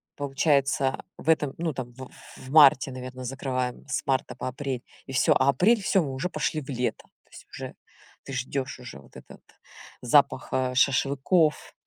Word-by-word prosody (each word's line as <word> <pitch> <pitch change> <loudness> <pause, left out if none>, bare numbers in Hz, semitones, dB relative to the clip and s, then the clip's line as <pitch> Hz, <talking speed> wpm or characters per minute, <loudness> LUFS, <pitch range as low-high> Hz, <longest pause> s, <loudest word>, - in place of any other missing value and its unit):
получается 140 -1 +1
в - - -13
этом, 150 -4 +2
ну, 165 -2 -2
там 125 -1 -6
в 130 0 -9 0.3
в 130 - -12
марте, 140 -3 +6
наверно, 130 0 -8
закрываем 130 -1 -3
с - - -2
марта 130 -2 -1
по 125 - -5
апрель, 130 -1 -4 0.3
и - - -7
всё. 130 - +4
А 130 +1 +3
апрель- 210 +9 +3
всё, 190 -2 +2
мы 135 - -4
уже 140 +8 -3
пошли 155 -3 -2
в 135 - -13
лето. 125 -2 -2 0.2
То - - -35
есть - - -13
уже - - -8 0.5
ты 135 - -8
ждешь 130 +1 -3
уже 125 - -10
вот 70 - -19
этот - - -14 0.6
запах, 130 +1 +3
э, 130 -1 0
шашлыков, 140 +5 +2
135 Hz, 175 wpm, -26 LUFS, 130-145 Hz, 0.6 s, марте